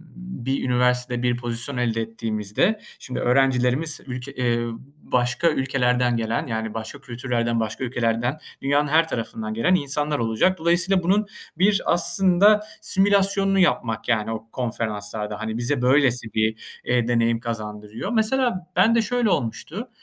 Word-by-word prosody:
bir 135 -8 -4
üniversitede 125 -1 +1
bir 120 -1 +1
pozisyon 120 +2 -4
elde 115 -2 0
ettiğimizde, 115 - -1 0.2
şimdi, 130 - -5
öğrencilerimiz 135 +4 +2
ülke, 125 +2 -6 0.2
ııı, 120 0 -3 0.3
başka 125 +6 +1
ülkelerden 125 -3 +1
gelen, 115 +6 -2
yani, 110 -2 -3
başka 115 +5 -7
kültürlerden, 120 -2 -2
başka 110 +3 -3
ülkelerden, 120 +2 -1 0.2
dünyanın 145 +2 +2
her 160 +3 +3
tarafından 110 -4 -4
gelen 115 +12 +2
insanlar 145 -1 0
olacak. 115 +12 +1
Dolayısıyla 175 +3 +2
bunun 200 +4 +2 0.3
bir 195 +3 +3
aslında 195 +4 +4 0.2
simülasyonunu 195 0 +2
yapmak 115 - +1
yani 110 -2 +1
o 110 0 -6
konferanslarda. 105 -3 -3
Hani, 110 0 -3
bize 120 +3 -1
böylesi 125 -4 +2
bir, 110 0 -2
ııı, 120 -1 +2
deneyim 115 -1 +2
kazandırıyor. 110 - -5
Mesela 225 -4 +1
ben 220 +6 +4
de 230 - +4
şöyle 240 0 0
olmuştu: 175 - -3
125 Hz, 135 wpm, -23 LUFS, 115-170 Hz, 0.3 s, aslında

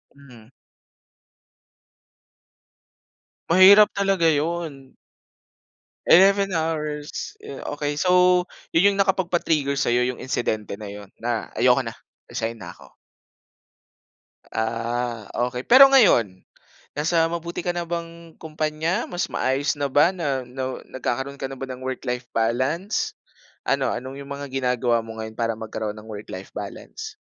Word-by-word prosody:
Mhm. 125 -5 -16 3.0
Mahirap 195 +4 +8
talaga 195 -4 +3
'yon. 155 -3 -2 1.1
11 195 +2 +6
hours. 155 - -3 0.4
Okey. 145 0 -2
So 180 0 +4 0.3
'yon 200 +5 +4
'yong 200 - -5
nakapagpa-trigger 175 -7 +1
sa'yo, 125 -3 +2
'yong 125 - -4
insidente 110 -5 -2
na 105 - -7
'yon 100 -1 -10
na 115 -1 -3
"Ayoko 130 +1 +4
na, 115 -1 -6 0.3
resign 115 +1 -3
na 85 - -7
ako." - - -17 1.6
Ah, 115 0 -2 0.2
okey. 125 0 -6
Pero 270 +2 +9
ngayon, 120 - +4 0.6
nasa 165 +1 +2
mabuti 170 +1 -4
ka 175 - -1
na 175 -1 -3
bang 170 -1 -6
kumpanya? 155 +5 -2
Mas 175 +1 -3
maayos 140 +3 0
na 145 - 0
ba 145 +5 +4
na 145 -8 -2 0.5
nagkakaroon 135 +2 -3
ka 135 - -3
na 135 - -7
ba 135 - -5
ng 125 - -7
work-life 125 -1 -4
balance? 130 - 0 0.5
Ano 135 -1 +1
ano 130 +2 -6
'yong 140 0 -9
mga 140 0 -6
ginagawa 125 -3 +1
mo 115 0 -9
ngayon 110 0 -7
para 115 -1 0
magkaroon 110 -1 -4
ng 105 - -11
work-life 100 -2 -8
balance? - - -8
140 Hz, 125 wpm, -23 LUFS, 120-170 Hz, 3.0 s, Pero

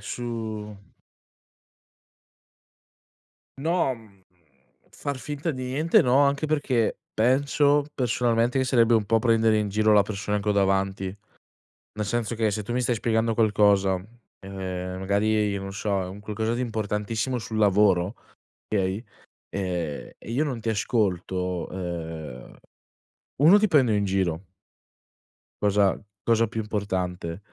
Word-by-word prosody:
su 110 -3 -5 2.8
No, 160 -2 +1
mhmm, 105 -5 -19 0.7
far 140 -1 -4
finta 145 +4 -4
di 130 -2 -6
niente 150 +6 +3
no. 125 +1 +3
Anche 140 +2 0
perché 140 -7 +1 0.2
penso, 140 +5 +3
personalmente, 120 0 +1
che 130 - +2
sarebbe 120 -3 +4
un 110 -2 +3
po' 115 +2 +2
prendere 115 -2 +3
in 105 -1 -1
giro 110 +2 +2
la 105 - +6
persona 105 0 -2
che 105 - -4
ho - - +4
davanti. 95 -1 0 0.8
Nel 105 0 -3
senso 115 +1 -2
che, 110 -1 +1
se 105 - -2
tu 120 - -4
mi 125 - +1
stai 125 - +1
spiegando 115 0 +1
qualcosa, 105 -3 +3 0.5
ehm, 95 -1 -5
magari, 105 +1 +1
non 95 0 -6
so, 100 -1 -1
è - - -5
un 95 +2 -9
qualcosa 110 +2 -2
di 120 - -2
importantissimo 110 +2 -2
sul 110 -1 -5
lavoro, 100 -1 +3 0.5
okay, 100 +1 -1 0.5
ehm, 90 -6 -3
e - - -10
io 130 +6 +1
non 135 -5 -3
ti 115 +1 -1
ascolto, 90 -5 -1
ehm, 80 -8 -6 0.9
1: 175 +8 +7
ti 215 - +3
prendo 135 -9 +4
in 105 -1 +1
giro 95 -4 0 1.2
cosa 100 -1 +2 0.3
cosa 115 0 +3
più 115 +1 -4
importante. 95 -5 -3
105 Hz, 135 wpm, -25 LUFS, 95-120 Hz, 2.8 s, 1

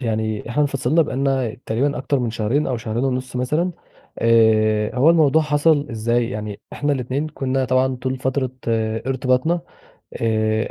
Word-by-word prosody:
يعني 110 -2 -2
إحنا 150 +5 +1
انفصلنا 140 +3 +2
بقى 130 - -5
لنا 135 -4 0
تقريبًا 135 +5 0
أكتر 140 +1 0
من 120 -3 -1
شهرين 120 +6 0
أو 125 - -1
شهرين 115 +3 -3
ونص 130 -1 -2
مثلًا، 150 +8 0 0.5
آآ 110 -2 +3
هو 145 +6 +5
الموضوع 160 -1 +4
حصل 145 0 +2
إزاي؟ 115 +2 0
يعني 105 -3 -5
إحنا 145 0 -1
الاتنين 135 +3 -2
كنا 135 -3 -1
طبعًا 130 +1 +1
طول 130 +1 -3
فترة 130 0 -1 0.2
ارتباطنا 130 +8 0 0.6
آآ 110 -1 0
130 Hz, 150 wpm, -21 LUFS, 115-140 Hz, 0.6 s, هو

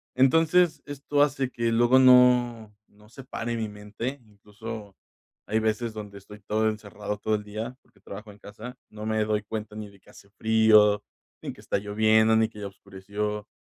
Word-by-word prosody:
Entonces, 160 +4 +3
esto 145 0 -1
hace 135 -3 +1
que 115 0 -1
luego 120 +3 +4
no 125 -4 +5
no 105 +1 -22
se 130 +2 -12
pare 120 -2 -4
mi 110 -2 -3
mente. 105 +6 -6
Incluso, 105 0 -10 0.5
hay 110 +1 +1
veces 110 +1 -1
donde 105 -2 -8
estoy 105 +1 -13
todo 110 +2 0
encerrado 105 -1 -6
todo 110 +1 0
el 105 - -4
día, 110 +4 -6
porque - - -29
trabajo 105 +2 -10
en 100 - -16
casa, 110 +5 -10
no 105 0 -8
me 110 0 0
doy 105 0 0
cuenta, 105 0 -6
ni 105 -1 -7
de 100 -1 -20
que - - -23
hace 100 - -17
frío, 110 -1 +4 0.4
ni - - -5
que - - -16
está - - -1
lloviendo 110 +2 +3
ni 110 0 +3
que 105 - -13
ya 100 - -5
oscureció 100 +2 -6
110 Hz, 185 wpm, -26 LUFS, 105-120 Hz, 0.5 s, no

